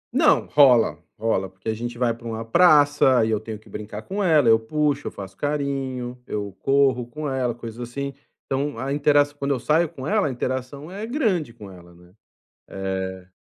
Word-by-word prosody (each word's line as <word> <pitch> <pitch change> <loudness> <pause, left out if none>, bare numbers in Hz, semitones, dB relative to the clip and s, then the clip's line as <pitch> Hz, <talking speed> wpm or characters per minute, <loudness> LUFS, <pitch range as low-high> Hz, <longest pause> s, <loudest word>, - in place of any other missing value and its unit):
Não, - - +5
rola, 120 - +4
rola, 105 -4 0
porque 95 +3 -15
a 110 - +1
gente 120 +2 -5
vai 120 -2 +1
pra 115 0 -10
uma 115 0 -4
praça 145 -4 +5
e 110 - -1
eu 110 - +1
tenho 110 0 -7
que 110 - -22
brincar 105 0 -7
com 200 +1 -3
ela, 155 -8 +4
eu 110 0 +6
puxo, 145 +4 -1
eu - - -4
faço 95 -1 -9
carinho, 135 -3 -3
eu 100 -2 -4
corro 135 -3 +2
com 150 +5 -5
ela, 130 -3 -1
coisas 115 -1 -9
assim, 140 +2 -4 0.3
então 140 0 -2
a 135 +3 -2
interaç 145 0 +3
quando 140 -1 -1
eu 125 - -4
saio 160 +4 +2
com 130 - -9
ela, 210 -3 +2
a - - -2
interação 130 +5 -4
é 200 +3 -6
grande 215 - 0
com 105 -4 -12
ela, 85 -1 -15
né, 90 +1 -20 0.6
eh 95 -1 -4
125 Hz, 195 wpm, -23 LUFS, 110-145 Hz, 0.6 s, eu